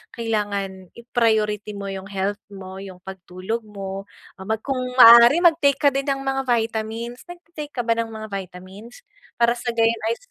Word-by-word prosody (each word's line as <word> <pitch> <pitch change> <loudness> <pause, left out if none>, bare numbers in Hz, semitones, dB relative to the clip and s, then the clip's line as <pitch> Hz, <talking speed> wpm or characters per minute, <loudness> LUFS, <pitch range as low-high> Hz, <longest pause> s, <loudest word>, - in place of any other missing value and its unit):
kailangan 200 -5 -3
i-priority 220 -3 0
mo 200 0 -6
yung 195 0 -7
health 200 +1 -2
mo, 190 -1 -9
yung 190 -2 -11
pagtulog 190 +4 -6
mo, 195 -2 -7 0.4
ah, - - -8
mag 220 0 -1
kung 270 -2 -2 0.2
maaari 235 +5 +9
mag-take 305 -5 +4
ka 290 - +3
din 275 0 -1
ng 275 0 0
mga 270 0 -1
vitamins. 230 +1 -2
Nagte-take 335 -4 -9
ka - - -6
ba 230 0 +2
ng 230 0 -2
mga 220 0 -7
vitamins? 195 - -9 0.4
Para 235 0 +4
sa 240 0 -3
gayon 230 0 +2
ay 230 - 0
225 Hz, 170 wpm, -22 LUFS, 195-240 Hz, 0.4 s, maaari